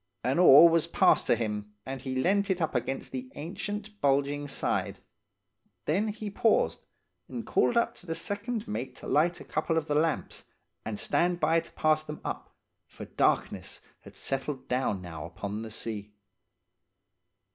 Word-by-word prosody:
An 130 +6 +1
oar 165 -2 +10
was 165 -1 +3
passed - - +4
to - - +5
him, 105 -2 -3
and 135 -1 -5
he 130 0 -4
leant 200 +9 +2
it 190 -1 +1
up 160 - 0
against 135 - -2
the 130 -1 -5
ancient, 205 +6 -6
bulging 145 +1 +1
side; 135 - -1 0.9
then 195 +8 +1
he 210 -1 -4
paused, 220 +2 +2 0.5
and - - -5
called 240 - +2 0.2
to 180 - -17
the 165 - -2
second 220 +4 -3
mate 130 - -4
to - - -11
light 170 +4 +2
a - - -9
couple 165 - -1
of 160 - 0
the 150 - -1
lamps, 155 +2 0 0.4
and 105 -2 -4
stand 175 0 +1
by 160 +1 +3
to 165 - -10
pass 155 0 +2
them 150 -1 -7
up, - - -5 0.3
for - - -9
darkness - - 0 0.2
had - - -15
settled 135 0 -3
down 125 -7 0
now 80 -3 -7
upon 100 +5 -5
the 110 - -6
sea. 105 -1 -5
150 Hz, 165 wpm, -29 LUFS, 130-175 Hz, 0.9 s, oar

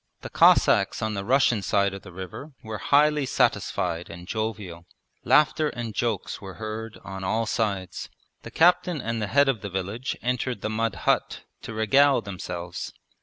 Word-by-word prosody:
The - - -8
Cossacks - - +4
on 110 0 -1
the 100 -1 -3
Russian 120 -1 +3
side 100 0 +1
of 95 - -7
the 95 - -12
river 95 - -8
were 110 -1 -6
highly 150 -1 +3
satisfied 85 -7 0
and 85 +1 -10
jovial. 105 -6 -4 0.4
Laughter 150 +1 +3
and 120 -4 -5
jokes 115 -3 -2
were 95 -2 -9
heard 110 +1 -6
on 95 +1 -7
all 110 +4 0
sides. 100 -6 -2 0.3
The - - -9
captain 175 -1 +3
and 115 -2 -3
the 105 - -1
head 140 +6 +4
of 125 -7 0
the 100 - -5
village 100 +7 -4
entered 125 0 -1
the 110 - -2
mud 115 -2 -1
hut - - +1 0.2
to - - -7
regale 135 +6 +4
themselves. 85 -2 -6
110 Hz, 170 wpm, -25 LUFS, 95-125 Hz, 0.4 s, Cossacks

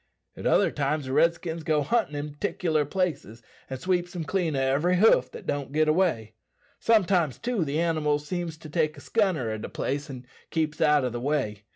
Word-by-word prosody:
At - - -3
other - - +3
times 145 0 -1
the 130 - -4
Redskins 170 +1 +1
go 155 -1 +1
huntin' 225 -5 0
in 145 0 -4
'ticlur 155 -3 -1
places, 145 - -2 0.3
and 130 -1 -5
sweeps 175 +2 -1
them 175 -3 -3
clean 165 -1 -1
o' - - 0
every 140 +7 +2
hoof 175 - +5
that - - -10
don't 140 -2 -3
git 155 +1 +2
away. 155 - +1 0.5
Sometimes, 185 - +2
too, 235 -6 -1
the 150 +1 -1
animals 150 -3 0
seems 170 -1 -4
to 155 -1 -11
take 155 -2 0
a - - -9
scunner 170 - 0
at 110 - -6
a - - -5
place, 145 +3 -3
and 130 -2 -8 0.2
keeps 155 -2 -2
out 150 -3 +4
o' - - 0
the 120 0 -5
way. 125 -8 -2
155 Hz, 200 wpm, -26 LUFS, 140-175 Hz, 0.5 s, hoof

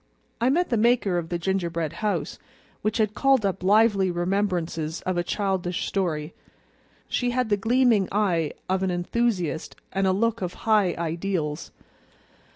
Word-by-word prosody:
I 240 - +3
met 350 +6 +2
the 235 - +1
maker 215 -5 +3
of 165 -1 -6
the 175 - -1
gingerbread 170 -3 -2
house, 185 -8 -2 0.4
which 215 - 0
had 215 -2 +1
called 270 -4 +3
up 195 -1 -1
lively 200 0 +4
remembrances 175 -3 -1
of 185 - -2
a 175 - +1
childish 185 -2 -1
story. 165 -5 -2 0.7
She 245 - 0
had 250 -1 0
the 205 - +4
gleaming 230 -2 +3
eye 180 -7 +1
of 190 0 0
an 190 - 0
enthusiast 180 -2 -1 0.2
and 195 0 +1
a - - +4
look 230 +3 0
of 180 -1 -3
high 210 -5 +3
ideals. 165 -2 -2
190 Hz, 155 wpm, -25 LUFS, 175-215 Hz, 0.7 s, lively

